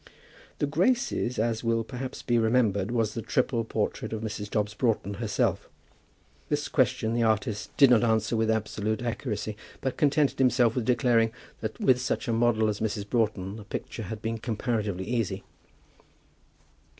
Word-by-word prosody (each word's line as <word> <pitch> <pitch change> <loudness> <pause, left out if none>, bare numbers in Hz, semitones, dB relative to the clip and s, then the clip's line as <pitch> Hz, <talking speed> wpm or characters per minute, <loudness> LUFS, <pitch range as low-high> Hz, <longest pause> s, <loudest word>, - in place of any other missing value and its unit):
"The - - +1
Graces," 165 - +1
as 115 +1 0
will 115 0 +1
perhaps 125 +2 -6
be 120 -1 +2
remembered, 110 -4 +2
was 115 -3 0
the 115 - -3
triple 115 +1 0
portrait 110 0 -2
of 110 0 -4
Mrs. 105 -1 -4
Dobbs 105 0 -1
Broughton 110 -3 0
herself. 110 -3 0 0.8
This - - 0
question 110 +1 +1
the 120 - +1
artist 110 -1 0
did 140 -3 +7
not 120 -1 +5
answer 110 0 +2
with 110 0 +1
absolute 110 0 -1
accuracy, 110 -2 -3 0.2
but 130 -1 -3
contented 145 -1 +2
himself 125 -3 +4
with 125 -3 -1
declaring 120 -2 +3 0.3
that 110 -1 -5
with 125 -1 +3
such 125 - -2
a 115 - +1
model 115 -1 +3
as 105 -1 -1
Mrs. 105 -2 -2
Broughton 105 -4 -1
the 105 - -9
picture 105 - -6
had 105 +1 -6
been 115 0 -2
comparatively 110 -5 -2
easy. 115 -3 -2
115 Hz, 160 wpm, -27 LUFS, 110-120 Hz, 0.8 s, did